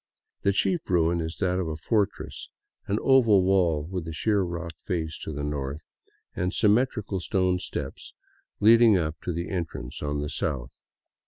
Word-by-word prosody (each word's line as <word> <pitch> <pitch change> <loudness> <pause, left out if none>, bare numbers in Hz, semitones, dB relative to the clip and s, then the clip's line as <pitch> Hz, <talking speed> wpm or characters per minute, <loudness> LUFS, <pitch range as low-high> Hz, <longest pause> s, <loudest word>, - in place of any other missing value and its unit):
The 100 - +3
chief 165 - 0
ruin 85 -1 +2
is 80 +1 -4
that 90 -2 0
of 90 - -1
a 80 - -3
fortress, 100 +5 -2 0.4
an 100 - 0
oval 115 -8 +5
wall 90 -6 +2
with 90 -1 -5
a - - -4
sheer 105 +6 +1
rock 85 -2 -4
face 80 -3 -2
to - - -6
the 70 -1 -4
north, 70 0 -3 0.5
and 90 +1 -1
symmetrical 105 -2 +2
stone 90 0 +1
steps - - -6 0.4
leading 115 -1 +6
up 80 -2 -3
to 90 - -3
the 85 +1 -4
entrance 85 -8 -4
on 75 0 -2
the 75 - -3
south. 65 -5 -3
90 Hz, 165 wpm, -26 LUFS, 80-100 Hz, 0.5 s, leading